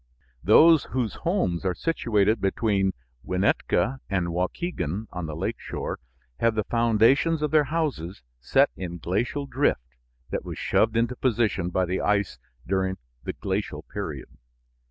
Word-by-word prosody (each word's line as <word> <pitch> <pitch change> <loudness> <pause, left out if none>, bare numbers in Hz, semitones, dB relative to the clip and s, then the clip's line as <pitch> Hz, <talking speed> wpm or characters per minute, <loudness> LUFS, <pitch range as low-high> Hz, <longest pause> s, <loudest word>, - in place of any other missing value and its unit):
Those 160 +8 +6
whose 125 -4 -2
homes 165 - 0
are 90 -2 0
situated 110 - +1
between 95 -1 +1 0.3
Winnetka 105 +7 +1
and 90 -3 0
Waukegan 90 - -2
on 90 -2 -4
the 75 - -5
lake 80 - -3
shore - - -5 0.4
have 115 -1 +2
the 110 - +1
foundations 120 +9 +3
of 150 - 0
their 155 -2 +4
houses 130 - -3 0.2
set - - +3
in 85 -2 -5
glacial 110 - -1
drift 140 - +1 0.5
that - - -2
was - - -7
shoved 110 +1 +2
into 120 +2 +1
position 115 -8 0
by 95 +1 +1
the 90 +2 -2
ice 100 -2 0 0.3
during 95 0 0 0.3
the - - -3
glacial - - -3
period. - - -6
105 Hz, 140 wpm, -26 LUFS, 90-130 Hz, 0.5 s, Those